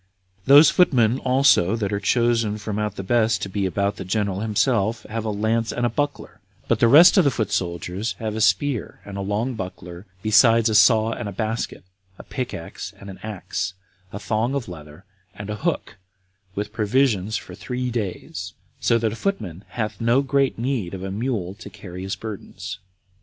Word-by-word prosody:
Those 145 +3 +8
foot 180 -4 +4
men 120 0 +3
also 125 -7 +3
that 105 -3 -2
are 100 - 0
chosen 115 0 +1
out - - -7
from 105 0 -4
the 105 -2 -3
rest 115 -1 +2
to 100 - -4
be 95 0 -1
about 100 +2 -1
the - - -5
general 100 0 -1
himself 110 +1 +1
have 115 0 -5
a - - -1
lance 110 +2 0
and 120 - -1
a - - +2
buckler, 145 +3 -3 0.3
but - - +1
the 115 - +5
rest 165 - +8
of - - +5
the 140 - +4
foot 110 -6 -2
soldiers 95 +2 -2
have 110 +1 -4
a 110 - -2
spear 110 +5 +1
and 100 - -8
a 100 - -3
long 105 +6 -1
buckler, 90 -2 -8 0.2
besides 115 +1 +5
a - - 0
saw 110 +1 +5
and 110 - -4
a - - -6
basket, 110 +2 -3 0.3
a - - -10
pick 130 -2 -4
axe 85 - -7
and 100 0 -9
an 95 - -12
axe, 100 -2 -4 0.4
a - - -6
thong 110 +5 -1
of 135 -4 -3
leather 80 0 -11 0.3
and 105 0 -6
a 105 - -4
hook, 160 -9 -2 0.6
with 105 +1 -4
provisions 110 -2 +1
for 90 - -10
three 125 +7 -4
days, 105 -7 -4 0.3
so 115 - +3
that 110 -2 -1
a - - -5
footman 105 - -3
hath 110 -3 -4
no 120 +4 +3
great 140 0 +1
need 115 -7 -2
of 95 - -7
a 95 - -4
mule 105 -4 -2
to 100 - -11
carry 90 -1 -9
his 95 +1 -3
burdens. 110 -3 -7
110 Hz, 195 wpm, -23 LUFS, 100-120 Hz, 0.6 s, Those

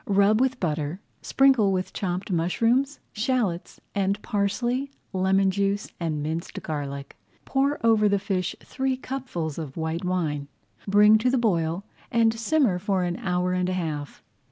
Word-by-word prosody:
Rub 200 +3 +4
with 260 -1 +1
butter, 155 0 -2 0.2
sprinkle 265 -7 +4
with 185 -1 -2
chopped 185 +1 -3
mushrooms, 230 - +1
shallots, 215 -7 -1
and 200 0 0
parsley, 240 +7 0 0.2
lemon 190 +1 +3
juice, 200 +1 -1
and 155 -4 -2
minced 160 +2 -4
garlic. 140 -3 -5 0.3
Pour 275 +2 +1
over 215 -2 +5
the 200 - +3
fish 190 -2 -2
three 265 -1 -2
cupfuls 250 - -4
of 150 -3 -7
white 160 +2 -2
wine, 160 -6 -1 0.4
bring 210 +2 +6
to 250 +3 +2
the 260 - +2
boil, 175 -5 0 0.2
and 230 -1 +3
simmer 230 -4 +1
for 190 -1 0
an 175 -1 -2
hour 180 -5 0
and 180 0 0
a - - -1
half. 155 -5 -4
195 Hz, 150 wpm, -25 LUFS, 170-230 Hz, 0.4 s, bring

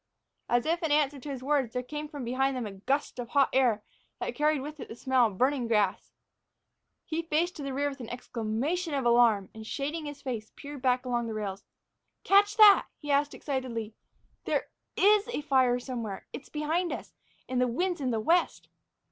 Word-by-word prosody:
As 240 0 +2
if 335 +3 0
in 320 -3 -1
answer 290 -1 +2
to 285 - -8
his 265 -2 -5
words, 275 -4 +1
there 250 - -2
came 300 +4 -5
from 290 -3 -7
behind 265 +2 0
them 245 - -3
a 205 - -5
gust 255 +8 -2
of 240 -1 -5
hot 275 +1 +3
air 240 -5 +3 0.4
that - - -3
carried 300 -1 +1
with 300 +2 -7
it - - -7
the - - -8
smell 255 -1 +3
of 200 -4 -8
burning 260 0 +1
grass. 210 -4 +1 0.9
He 325 +1 -2
faced 330 +2 0
to - - -6
the 275 -1 -4
rear 285 +2 0
with 275 -1 -6
an 235 -2 -7
exclamation 250 +8 -2
of 270 -3 -1
alarm 235 -5 +4
and, 220 - -9
shading 295 +5 -3
his 290 -1 -8
face, 230 -5 -4
peered 285 -1 -9
back 250 0 +1
along 240 -2 -1
the 220 - -4
rails. 200 -2 -4 0.6
"Catch 410 +2 +4
that?" 420 -2 +8
he 295 -1 -4
asked 285 +1 +2
excitedly. 245 -6 -4 0.5
"There - - -1 0.3
is 415 +1 +5
a 475 - -3
fire 260 -4 +3
somewheres; 235 -6 -5
it's 290 - -8
behind 320 +4 -1
us. - - -6 0.3
And 255 -1 0
the 250 - +3
wind's 345 +7 -1
in 260 - 0
the 225 -2 0
west!" 335 +11 +1
270 Hz, 200 wpm, -29 LUFS, 240-300 Hz, 0.9 s, that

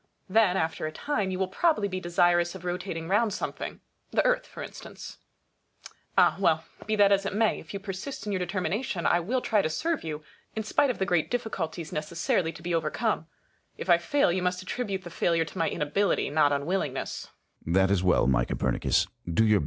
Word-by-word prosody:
Then, 195 -2 +4
after 160 -2 -1
a - - -4
time, 210 - -1
you 185 - -2
will 190 0 0
probably 215 - +2
be 185 -1 -3
desirous 175 0 +2
of 180 -1 -9
rotating 175 -2 -3
round 210 +3 +2
something - - -5
— - - -44
the - - +2
Earth - - +2
for - - -8
instance. - - -10 1.0
Ah! - - +5
well, 160 -4 +3 0.2
be 215 - +1
that 200 -1 +5
as 195 0 +4
it 195 0 -3
may; 220 0 +2
if - - -11
you 200 - -4
persist 195 +8 -6
in 210 - -2
your 190 - 0
determination, 185 +2 -2
I 175 - +4
will 240 +9 -1
try 215 -4 +2
to 155 - -1
serve 320 - -1
you, 155 -1 -5 0.3
in 220 - -2
spite 265 +6 +2
of 250 - -1
the 190 - 0
great 175 -5 +1
difficulties 175 -9 -3
necessarily 165 +2 0
to 160 0 -13
be 175 0 -2
overcome. 165 +3 0 0.5
If 185 - 0
I 170 - +6
fail, 280 +4 +2
you 185 +1 0
must 180 0 -1
attribute 195 -2 -3
the 175 - -9
failure 165 -1 +1
to - - -10
my 165 - +2
inability, 170 +3 0
not 145 -1 +4
unwillingness. 145 -1 -1 0.5
Sun. 85 - -2
That 95 +1 +4
is 100 -3 +3
well, 90 -8 +3
my 60 -2 +3
Copernicus. - - +1
Do - - -6
your - - -30
best. 85 -1 -6
Copernicus. 110 -1 +5
180 Hz, 215 wpm, -28 LUFS, 160-205 Hz, 1.0 s, I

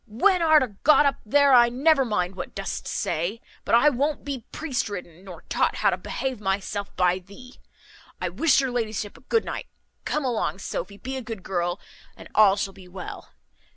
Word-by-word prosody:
when 360 - +2
art 315 -3 +6
a - - -1
got 300 0 +6
up 275 -1 +2
there 280 +5 +4
I 240 -1 +7
never 275 +3 +3
mind 195 -6 -1
what 180 - -7
dost 195 0 -4
say; 175 +8 -2 0.2
but - - +3
I 285 +6 +6
won't 285 +3 -1
be 270 -5 -5
priest 275 -8 -2
ridden, 180 -3 -8
nor 185 -3 -11
taught - - 0
how - - +2
to - - -1
behave 260 -5 -4
myself 200 +1 -2
by 180 0 +2
thee. 205 +8 -15 0.6
I - - -1
wish 325 -4 +3
your 265 -2 -1
ladyship 220 -4 -3
a - - -16
good 450 - 0
night. - - -5 0.4
Come 300 -2 -1
along, 235 -5 -1
Sophy; 195 +1 -5
be 265 +4 -5
a - - -4
good 225 -5 -7
girl, 175 0 -2 0.4
and - - -11
all 205 -2 +6
shall 200 -1 -3
be 185 -1 -14
well. 180 0 -8
225 Hz, 195 wpm, -25 LUFS, 195-270 Hz, 0.6 s, I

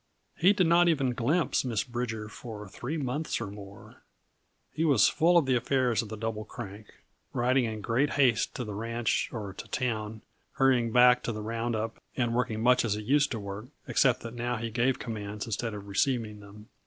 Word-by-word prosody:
He 185 +4 +5
did 200 -3 +2
not 170 +1 +5
even 135 -6 +1
glimpse 140 +4 +1
Miss 115 -5 -1
Bridger 120 -4 -4
for 105 -2 -9
three 125 +11 -5
months 145 +2 -2
or 115 - -3
more. 100 -1 -12 0.7
He 160 - -1
was 140 -11 +5
full 175 +2 +4
of 165 - +4
the 130 -1 +2
affairs 125 -1 +1
of 110 - -8
the 110 - -6
Double 110 0 -3
Crank; 105 -1 -9 0.5
riding 125 +1 +2
in 110 -1 -4
great 120 +7 +1
haste 130 -5 +2
to 125 - -3
the 105 -3 -6
ranch 115 +2 -1
or 105 -4 -5
to - - -9
town, 110 -3 -3 0.3
hurrying 130 -4 +3
back 125 +1 +6
to 120 - -2
the 105 -1 -5
round 115 +1 -2
up 110 +1 -4 0.2
and 120 -3 +1
working 115 -2 -1
much 125 +1 +5
as 110 -3 0
he 105 - -4
used 145 +5 +3
to 115 - -3
work, 100 +3 -7 0.2
except 125 -2 +3
that 115 -1 -7
now 120 0 -2
he 115 0 -4
gave 125 +4 +1
commands 105 -2 -5
instead 115 0 -3
of 100 -1 -8
receiving 110 +1 0
them. 105 +1 -14
115 Hz, 200 wpm, -29 LUFS, 110-130 Hz, 0.7 s, back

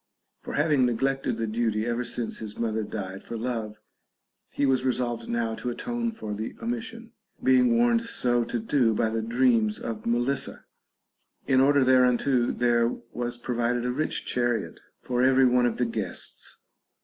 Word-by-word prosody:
For - - -6
having 150 -3 +3
neglected 135 +3 0
the 115 - -1
duty 110 -1 0
ever 120 +1 -1
since 120 -1 -3
his 110 -1 -7
mother 110 -1 -1
died 95 -3 -6
for 115 - -6
love, 110 -3 -4 0.7
he 145 - 0
was 130 -2 +2
resolved 120 -2 -1
now 115 -1 -1
to 125 - -4
atone 235 - -2
for 110 - -6
the 110 +2 -5
omission, 230 0 -5 0.3
being 250 -2 +4
warned 235 -1 +3
so 120 - +1
to 120 - -3
do 115 0 +2
by 110 0 +1
the 115 0 -1
dreams 115 -2 +2
of 110 -1 -5
Melissa. 120 +4 -1 0.8
In 130 -1 +4
order 140 0 +4
thereunto, 125 -1 +3
there 120 -1 +2 0.3
was 120 0 -3
provided 120 0 -1
a 125 - 0
rich 155 +5 -2
chariot 120 -3 -1 0.2
for 125 -1 -1
every 130 0 +5
one 125 -1 +4
of 115 - -2
the 125 - +1
guests. 110 -5 -5
120 Hz, 160 wpm, -26 LUFS, 115-135 Hz, 0.8 s, every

